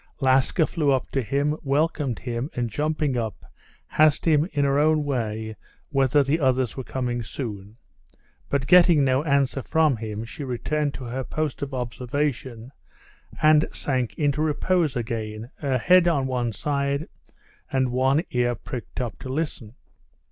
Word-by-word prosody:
Laska 135 +5 +3
flew 155 -4 -1
up 130 -1 0
to 135 - 0
him, 140 +5 0
welcomed 140 -3 0
him, 120 +3 -4
and 120 -2 -2
jumping 150 +1 -1
up, 110 -3 -4 0.5
asked 155 -1 +5
him 155 +1 +3
in 145 -1 +1
her 140 +1 +2
own 155 0 +3
way 110 -5 -3 0.4
whether 135 0 +3
the 145 +4 +1
others 130 -4 +1
were 130 - -5
coming 125 -1 -2
soon, 105 -2 -7 0.7
but 140 -1 0
getting 175 -3 +6
no 130 0 +2
answer 140 -2 +1
from 155 -2 +2
him, 110 -1 -5
she 145 - -8
returned 140 +3 -2
to 130 - -7
her 125 +2 -4
post 155 +1 -3
of 140 -1 -3
observation 125 -1 -3 0.7
and 155 0 +5
sank 130 -4 -2
into 145 0 +1
repose 155 0 +1
again, 115 -1 -4
her 135 -3 0
head 180 +6 +5
on 145 -6 +2
one 125 -3 -1
side, 140 +5 -1 0.6
and 130 -2 +1
one 135 +5 +2
ear 120 -1 +1
pricked 120 -1 -7
up 120 -6 -4
to 130 - -8
listen. 130 -6 -4
135 Hz, 155 wpm, -24 LUFS, 120-150 Hz, 0.7 s, getting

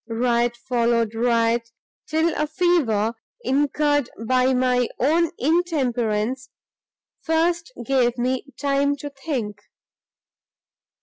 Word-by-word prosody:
Riot 235 +1 +1
succeeded 235 -2 0
riot, 230 0 +1 0.4
till 320 +1 +1
a 300 - 0
fever, 295 - +1 0.3
incurred 290 - +1 0.2
by 255 +2 +3
my 250 -1 +2
own 325 +5 +2
intemperance, 260 -6 0 0.7
first 335 +4 0
gave 250 -2 +2
me 255 +2 -1
time 280 0 +1
to 290 +1 -7
think. 260 -8 -4
255 Hz, 95 wpm, -23 LUFS, 235-300 Hz, 0.7 s, by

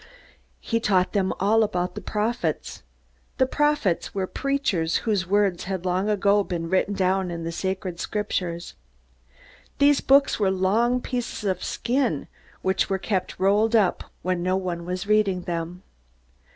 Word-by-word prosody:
He 230 - -1
taught 190 -4 +2
them 195 -3 +1
also 220 +3 +4
about 180 -3 -1
the - - -6
prophets. 220 +3 -2 0.6
The 260 - +4
prophets 295 - 0
were 190 -1 0
preachers 195 -11 -1
whose 205 -5 0
words 200 -2 +1
had 190 -1 -4
long 185 +3 0
ago 205 0 +3
been 170 -3 -4
written 190 +2 +1
down 190 0 +1
in 170 -1 -5
the 165 - -3
sacred 185 0 -3
Scriptures. 180 -5 -3 1.0
These 285 0 +4
books 275 -2 +4
were 200 -2 +3
long 220 +7 +2
pieces 245 -4 -4
of 190 -3 -1
skin, 240 - -1 0.4
which 190 +1 +1
were 195 - +1
kept 190 -1 -2
rolled 210 +4 +3
up 200 -5 +2 0.2
when 185 -1 0
no 185 +1 +1
one 175 -3 -4
was 180 +2 -3
reading 200 -3 +2
them. 175 +1 -4
190 Hz, 150 wpm, -24 LUFS, 180-215 Hz, 1.0 s, also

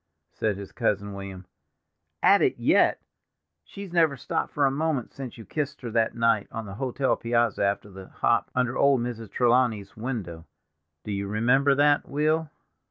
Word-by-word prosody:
said 105 -3 -1
his 100 -1 -8
cousin 100 0 -1
William. 95 -2 -8 0.8
"'At - - +6
it - - +2
yet!' - - +3 0.6
She's 195 -3 -10
never 160 -5 +3
stopped - - -3
for 145 - +1
a 135 - +3
moment 145 -3 -1
since 130 -3 -8
you 115 - -10
kissed 150 -1 -4
her 120 -3 -5
that 115 0 +1
night 115 -3 +2
on 115 0 -5
the 100 - -8
hotel 130 +4 0
piazza 115 -2 0
after 100 +1 -1
the 95 0 -11
hop, - - 0
under 125 0 0
old 140 -3 +3
Mrs. 115 -3 -5
Trelawney's 120 -5 +1
window—do 85 - -8
you 100 0 -2
remember 125 +7 +3
that, 145 +1 +3
Will?" 155 +2 0
120 Hz, 165 wpm, -26 LUFS, 100-140 Hz, 0.8 s, At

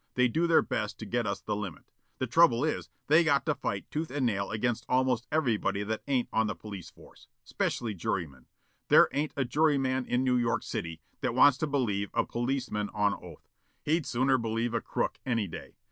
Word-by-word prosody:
They 125 0 +4
do 165 +8 +1
their 165 - +5
best - - -3
to - - -7
get - - -1
us - - -3
the 105 - -2
limit. 100 -5 -7 0.3
The 130 - -1
trouble 130 -1 +4
is, 155 - -2 0.2
they 160 +4 +5
got 145 -4 +2
to 155 - +2
fight 100 -7 -3
tooth 155 +1 -2
and 135 -1 -1
nail 100 -4 0
against 115 +2 -1
almost 125 -3 +1
everybody 115 -9 +1
that 110 +1 -3
ain't 130 -3 +1
on 110 0 +2
the 105 - -3
police 100 -5 -9
force. - - -18 0.2
Specially 115 -3 -2
jurymen. 80 -8 -4 0.4
There - - +7
ain't 145 +2 -1
a 135 - +1
juryman 135 -2 +1
in 125 +1 +1
New 125 -1 +2
York 120 -1 0
City 80 -1 -5 0.2
that - - -2
wants 140 -2 +6
to 155 - 0
believe 110 -8 0
a - - +2
policeman 120 -4 -2
on 105 -1 +2
oath. - - -11 0.4
He'd 160 0 0
sooner 130 +2 +2
believe 115 +1 -1
a 115 - 0
crook, - - -2
any 115 -4 0
day. 85 - -9
120 Hz, 200 wpm, -29 LUFS, 105-140 Hz, 0.4 s, There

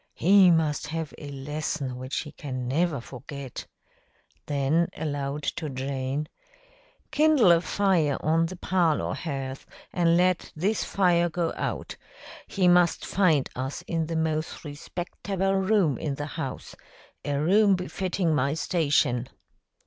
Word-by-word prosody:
He 190 +1 +6
must 160 -3 +1
have 160 0 -4
a 145 - -8
lesson 140 -1 -4
which 130 +2 -3
he 150 - -9
can 130 -4 -5
never 155 +2 +1
forget." 135 +1 -8 0.8
Then 145 +4 +1
aloud, 145 -1 -3
to 155 -3 -3
Jane, 135 +2 -3 0.8
"Kindle 300 - +5
a 170 -1 +5
fire 180 -7 +1
on 165 +2 +2
the 185 - -7
parlor 175 -3 +1
hearth 135 -4 -5 0.3
and 170 -1 +3
let 180 0 +1
this 200 +7 0
fire 175 -3 +2
go 170 0 -1
out. - - -4 0.5
He 190 -3 +1
must 175 -1 +4
find 165 -8 +2
us 130 +2 -4
in 165 -2 -2
the 165 - -3
most 160 -1 -2
respecterble 190 +5 -3
room 185 - +3
in 145 -3 -2
the 145 - -4
house 135 -6 -5 0.5
a 145 - -1
room 195 +6 +4
befitting 180 -1 -1
my 140 +1 +1
station." 145 -7 +1
160 Hz, 135 wpm, -26 LUFS, 140-180 Hz, 0.8 s, He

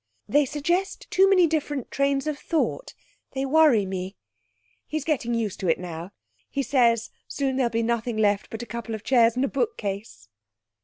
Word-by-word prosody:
They 290 0 +3
suggest 345 +8 -1
too 385 +1 +5
many 370 -3 +6
different 295 -4 -2
trains 275 0 +1
of 300 -1 -3
thought. 335 +9 -2 0.4
They 270 0 -1
worry 280 -7 +4
me. 190 0 -5 0.7
He's 310 -2 -3
getting 255 -6 0
used 215 -4 -2
to 190 - -2
it - - +3
now. 170 -1 -6 0.4
He 275 - -1
says, 235 -5 +2 0.2
soon 270 -2 -1
there'll 255 -3 +2
be 230 0 -1
nothing 235 0 -1
left 205 -2 +1
but 225 +1 -6
a - - -6
couple 235 -1 -5
of 215 - -9
chairs 235 -1 +4
and 255 +2 +1
a - - 0
bookcase!' 205 - -3
250 Hz, 175 wpm, -25 LUFS, 220-295 Hz, 0.7 s, many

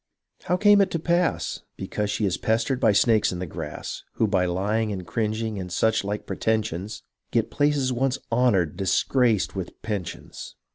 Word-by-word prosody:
' - - -33
How 180 - +1
came 205 +1 +6
it 195 - +2
to - - -1
pass? 170 +2 0
' - - -51
Because 105 -1 -3
she 105 - 0
is 95 -2 +1
pestered 115 +4 0
by - - +4
snakes 110 +1 +3
in 90 - -4
the 90 - -3
grass, 80 -2 -6
Who 115 - +1
by 95 -3 +2
lying 105 +5 0
and 95 -3 -5
cringing, 110 +1 -2
and 90 -1 -6
such 110 +5 +2
like 105 +1 -3
pretensions 110 -3 -2 0.3
Get 115 -2 0
places 145 -3 +1
once 130 +2 0
honoured 100 -10 +2
disgraced 110 +3 +2
with 95 -2 -6
pensions. 100 -6 -6
110 Hz, 180 wpm, -25 LUFS, 95-125 Hz, 0.3 s, came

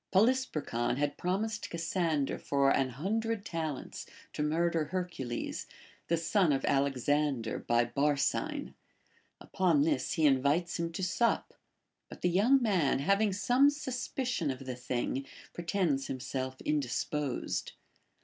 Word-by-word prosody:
Polysperchon 190 - +1
had 145 0 0
prom 185 +4 0
ised 220 -1 -5
Cassander 165 -3 -1
for 140 -1 +2
an 135 -1 +2
hundred 210 - -2
talents 160 -5 -4 0.3
to - - -3
murder 165 +1 +1
Her 180 +4 -2
cules, 130 -9 -5 0.4
the 170 - +2
son 170 +1 +2
of 135 - 0
Alexander 140 -2 +1
by 120 0 +2
Barsine. 145 - 0 0.7
Upon 170 -7 +2
this 150 -4 0
he 160 - +2
invites 145 +6 +2
him 170 0 -1
to 190 - -3
sup; 230 +6 +1 0.6
but - - -11
the 180 - +3
young 230 +10 +5
man, 180 - +2
having 200 +9 +2
some 245 +9 +4
suspicion 255 - -2
of 135 0 -4
the 130 -1 -4
thing, 125 +2 -2 0.3
pretends 170 -6 0
himself 130 0 -4
indisposed. 145 -1 -2
155 Hz, 130 wpm, -31 LUFS, 135-195 Hz, 0.7 s, young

